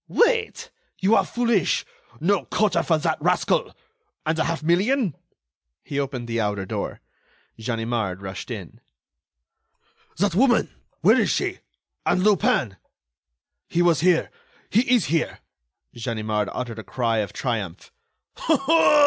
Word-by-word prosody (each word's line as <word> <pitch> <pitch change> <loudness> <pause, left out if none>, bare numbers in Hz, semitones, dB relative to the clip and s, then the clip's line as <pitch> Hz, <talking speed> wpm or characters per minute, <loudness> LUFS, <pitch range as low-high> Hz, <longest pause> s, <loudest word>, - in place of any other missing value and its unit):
"Wait! 470 -2 +1 0.3
you 195 +4 +2
are 195 - +5
foolish!... 235 -1 +1 0.3
No 195 +3 +1
quarter 210 -2 +1
for 160 - +2
that 155 - -1
rascal!... - - +1 0.5
And 155 +1 +1
the 160 - 0
half 165 -1 -2
million?" 195 - +2 0.7
He 140 - -3
opened 130 -4 -3
the 115 -1 -1
outer 105 -2 -1
door. - - -4 0.6
Ganimard 115 -4 -2
rushed 95 -1 -7
in. - - -7 1.4
"That 200 +1 +1
woman—where 240 +6 +2
is - - +1
she? - - -1 0.4
And 185 - +2
Lupin?" 150 - +2 0.9
"He 175 - +1
was 170 -5 +4
here... 175 +1 +3 0.4
he 240 +4 +3
is 240 -6 +4
here." 165 +3 0 0.6
Ganimard 110 -3 -2
uttered 120 -3 -5
a - - -7
cry 115 +2 -1
of 105 -3 -2
triumph. 105 -8 -4
155 Hz, 125 wpm, -24 LUFS, -, 1.4 s, are